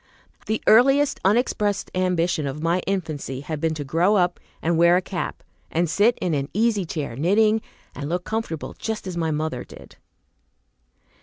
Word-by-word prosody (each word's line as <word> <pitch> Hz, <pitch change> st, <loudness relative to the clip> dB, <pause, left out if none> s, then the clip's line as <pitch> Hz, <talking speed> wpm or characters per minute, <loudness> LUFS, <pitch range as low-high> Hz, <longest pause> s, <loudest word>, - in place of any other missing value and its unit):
The 220 Hz, -, -1 dB
earliest 270 Hz, +5 st, +5 dB
unexpressed 205 Hz, -1 st, +1 dB
ambition 180 Hz, -4 st, 0 dB
of 135 Hz, +2 st, -4 dB
my 170 Hz, +2 st, +2 dB
infancy 155 Hz, -8 st, -3 dB
had 150 Hz, 0 st, -5 dB
been 160 Hz, -1 st, 0 dB
to 150 Hz, -, -4 dB
grow 170 Hz, +9 st, +2 dB
up 180 Hz, -2 st, +1 dB, 0.2 s
and 170 Hz, +1 st, 0 dB
wear 170 Hz, +2 st, +5 dB
a -, -, +1 dB
cap, 190 Hz, -2 st, -5 dB, 0.3 s
and 170 Hz, +2 st, +1 dB
sit 205 Hz, +9 st, +3 dB
in 175 Hz, -3 st, -1 dB
an 140 Hz, -1 st, -1 dB
easy 215 Hz, -3 st, +2 dB
chair 150 Hz, -7 st, -4 dB
knitting 210 Hz, -, +3 dB, 0.3 s
and 140 Hz, +1 st, -5 dB
look 175 Hz, +1 st, -1 dB
comfortable 220 Hz, -8 st, -4 dB
just 220 Hz, -2 st, -4 dB
as 185 Hz, -2 st, -5 dB
my 165 Hz, -2 st, -1 dB
mother 155 Hz, -4 st, -2 dB
did. -, -, -14 dB
175 Hz, 165 wpm, -23 LUFS, 155-210 Hz, 0.3 s, earliest